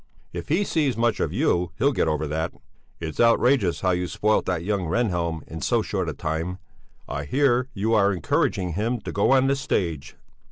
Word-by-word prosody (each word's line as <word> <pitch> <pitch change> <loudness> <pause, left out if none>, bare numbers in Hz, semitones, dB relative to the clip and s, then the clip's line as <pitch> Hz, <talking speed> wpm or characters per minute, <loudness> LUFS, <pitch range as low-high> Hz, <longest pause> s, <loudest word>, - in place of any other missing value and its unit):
"If 85 -1 -6
he 170 +7 +2
sees 150 -10 0
much 115 -2 +1
of - - 0
you, 85 -1 0
he'll 140 - +3
get 125 - 0
over 75 0 0
that. 80 +3 -2 0.5
It's 80 -2 -6
outrageous 115 -4 +3
how 95 - +2
you 90 0 -1
spoilt 105 +4 +1
that 90 -3 -1
young 100 -2 -1
Rehnhjelm 85 -5 -1
in 80 -1 -7
so - - +1
short - - -2
a - - -3
time. 80 +4 -3 0.5
I 70 0 -4
hear 130 - +2
you 110 +3 0
are 100 -2 +4
encouraging 90 0 0
him 115 +7 -1
to - - -6
go 100 - +1
on 135 0 +5
the 135 +1 +2
stage." 85 - -2
95 Hz, 195 wpm, -24 LUFS, 85-120 Hz, 0.5 s, on